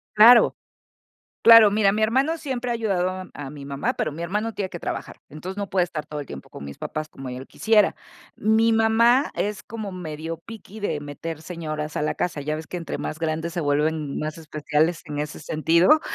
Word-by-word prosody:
Claro. 230 Hz, +3 st, +8 dB, 0.9 s
Claro, 230 Hz, -2 st, +9 dB
mira, 200 Hz, -1 st, +3 dB
mi 215 Hz, +1 st, 0 dB
hermano 270 Hz, +9 st, +2 dB
siempre 255 Hz, -5 st, -3 dB
ha -, -, -1 dB
ayudado 195 Hz, -6 st, 0 dB
a 185 Hz, 0 st, -6 dB
a 140 Hz, -2 st, -7 dB
mi 145 Hz, -1 st, -9 dB
mamá, 140 Hz, 0 st, -2 dB
pero 155 Hz, -, -1 dB
mi 155 Hz, +3 st, -8 dB
hermano 210 Hz, +5 st, -2 dB
tiene 195 Hz, -2 st, -3 dB
que 175 Hz, -, -8 dB
trabajar, -, -, -5 dB
entonces 180 Hz, +6 st, -7 dB
no 200 Hz, -1 st, -4 dB
puede 185 Hz, -2 st, +3 dB
estar 160 Hz, -3 st, -5 dB
todo 150 Hz, -, -7 dB
el 145 Hz, -, -5 dB
tiempo -, -, -9 dB
con 70 Hz, -, -9 dB
mis 70 Hz, 0 st, -8 dB
papás 155 Hz, 0 st, -4 dB
como 135 Hz, -3 st, -8 dB
yo 125 Hz, -, -6 dB
lo 130 Hz, -, -9 dB
quisiera. 215 Hz, -2 st, +3 dB, 0.4 s
Mi 220 Hz, +2 st, +3 dB
mamá 230 Hz, +4 st, +4 dB
es 205 Hz, 0 st, -2 dB
como 210 Hz, -3 st, -6 dB
medio 165 Hz, -2 st, -5 dB
picky 215 Hz, +2 st, -11 dB
de 165 Hz, -7 st, -1 dB
meter 145 Hz, +2 st, -6 dB
señoras 155 Hz, -3 st, -5 dB
a -, -, 0 dB
la 150 Hz, -, 0 dB
casa, 155 Hz, -4 st, -2 dB
ya 155 Hz, +2 st, -2 dB
ves 160 Hz, -1 st, -7 dB
que 180 Hz, -, -6 dB
entre 165 Hz, -, -5 dB
más 155 Hz, -, -5 dB
grandes 160 Hz, +1 st, -2 dB
se 175 Hz, -, -2 dB
vuelven 150 Hz, 0 st, 0 dB
más 155 Hz, +1 st, -4 dB
especiales 155 Hz, +1 st, 0 dB
en 145 Hz, -1 st, -4 dB
ese 150 Hz, 0 st, -5 dB
sentido. 165 Hz, -, +3 dB
170 Hz, 210 wpm, -24 LUFS, 155-215 Hz, 0.9 s, Claro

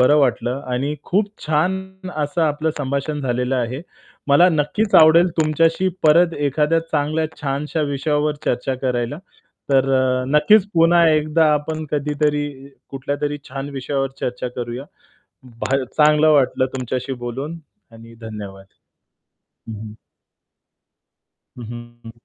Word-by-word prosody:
बरं 145 Hz, +4 st, +5 dB
वाटलं 125 Hz, -1 st, 0 dB
आणि 140 Hz, +4 st, -1 dB
खूप 200 Hz, +2 st, 0 dB, 0.2 s
छान. 190 Hz, +4 st, -2 dB
असं 150 Hz, +3 st, -1 dB
आपलं 155 Hz, +1 st, 0 dB
संभाषण. 140 Hz, +2 st, -2 dB
झालेलं 125 Hz, 0 st, -1 dB
आहे. 125 Hz, +3 st, -2 dB, 0.5 s
मला 160 Hz, +6 st, +6 dB
नक्कीच 175 Hz, +7 st, 0 dB
आवडेल 165 Hz, +3 st, +6 dB
तुमच्याशी 165 Hz, +4 st, +2 dB
परत 165 Hz, +2 st, +5 dB
एखाद्या 150 Hz, +3 st, +1 dB
चांगल्या 155 Hz, +2 st, 0 dB
छानशा 145 Hz, +3 st, -2 dB
विषयावर 150 Hz, +2 st, 0 dB
चर्चा 125 Hz, +2 st, -1 dB
करायला. 125 Hz, +2 st, -1 dB, 0.5 s
तर 135 Hz, 0 st, +3 dB
अ, 130 Hz, -1 st, +1 dB
नक्कीच 210 Hz, +6 st, +5 dB
पुन्हा 170 Hz, +1 st, +5 dB
एकदा 155 Hz, 0 st, +3 dB
आपण 155 Hz, +2 st, -3 dB
कधीतरी 150 Hz, 0 st, 0 dB, 0.5 s
कुठल्यातरी 145 Hz, +2 st, -3 dB
छान 135 Hz, +1 st, -5 dB
विषयावर 135 Hz, +1 st, -2 dB
चर्चा 125 Hz, 0 st, -3 dB
करूया. 120 Hz, +2 st, -5 dB, 0.8 s
भा 135 Hz, +2 st, 0 dB
चांगलं 150 Hz, +3 st, +4 dB
वाटलं 135 Hz, -3 st, +3 dB
तुमच्याशी 130 Hz, +1 st, -3 dB
बोलून. 140 Hz, +8 st, -5 dB, 0.3 s
आणि 115 Hz, 0 st, -14 dB
धन्यवाद. 100 Hz, -3 st, -8 dB, 1.0 s
हं, 110 Hz, -, -5 dB
हं. 105 Hz, 0 st, -9 dB, 1.6 s
हं, 120 Hz, -, -7 dB, 0.4 s
हं. 115 Hz, -, -9 dB
145 Hz, 120 wpm, -20 LUFS, 130-155 Hz, 1.6 s, मला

